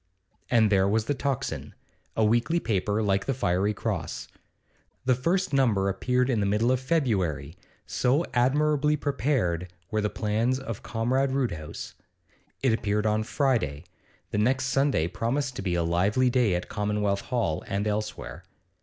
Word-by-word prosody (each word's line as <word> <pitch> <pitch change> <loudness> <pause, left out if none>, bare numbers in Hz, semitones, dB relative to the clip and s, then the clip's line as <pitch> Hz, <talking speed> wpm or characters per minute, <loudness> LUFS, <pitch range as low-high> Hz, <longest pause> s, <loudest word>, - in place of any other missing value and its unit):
And 110 -3 +4
there 95 -1 +4
was 110 +1 +1
the 145 - 0
'Tocsin,' 140 -2 -3 0.4
a 110 - +4
weekly 120 +10 +2
paper 105 - 0
like 100 -1 +1
the 135 - 0
'Fiery 100 -3 +1
Cross.' - - -3 0.8
The 130 - +4
first 170 +8 0
number 110 -8 +3
appeared 125 +6 +1
in 125 -5 +1
the 100 - +1
middle 110 +5 +2
of 130 - +2
February, 95 - 0 0.3
so 135 +7 +1
admirably 150 +4 +3
prepared 125 - 0 0.2
were 110 - +1
the 105 - 0
plans 110 +5 0
of 115 -6 -6
Comrade 125 +4 0
Roodhouse. 85 - -3 0.7
It 130 -4 +4
appeared 105 -1 0
on 110 0 +2
Friday; 110 - 0 0.5
the 105 - 0
next 130 +5 +2
Sunday 135 - +2
promised 130 +8 -2
to - - -3
be 90 -3 -1
a 85 - +1
lively 100 +10 +2
day 120 -7 +3
at 90 - -3
Commonwealth 105 -1 -1
Hall 95 -10 -1
and 100 +1 -1
elsewhere. 105 0 -3
110 Hz, 155 wpm, -27 LUFS, 100-130 Hz, 0.8 s, And